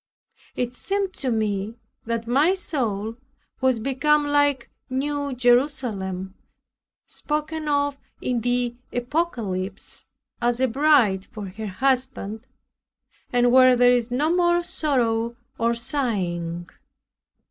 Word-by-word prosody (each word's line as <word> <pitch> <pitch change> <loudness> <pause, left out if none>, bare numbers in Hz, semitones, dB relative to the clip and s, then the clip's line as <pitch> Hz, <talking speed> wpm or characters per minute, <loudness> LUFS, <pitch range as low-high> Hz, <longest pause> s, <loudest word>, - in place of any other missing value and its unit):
It 245 0 -2
seemed 390 +7 -2
to 265 - -2
me 215 -2 -1 0.3
that 230 0 -2
my 285 +10 +3
soul 230 - -2 0.4
was 260 -2 +3
become 280 +5 +2
like 290 -3 +2 0.2
New 285 +2 -1
Jerusalem, 240 -7 +1 0.7
spoken 305 +1 -3
of 285 -1 +1 0.2
in 245 -2 -1
the 245 0 0 0.2
Apocalypse, 240 - -3 0.3
prepared 240 - +2
as 240 0 -1
a 260 - +3
bride 245 -7 +3
for 205 -3 -8
her 215 +3 -6
husband 250 0 -1 0.8
and 245 0 +3
where 255 0 +7
there 245 0 +5
is 245 -1 +1
no 295 +7 +1
more 345 -1 +3
sorrow, 235 -8 0 0.2
or 235 +1 +2
sighing. 180 - -2
245 Hz, 115 wpm, -24 LUFS, 225-285 Hz, 0.8 s, where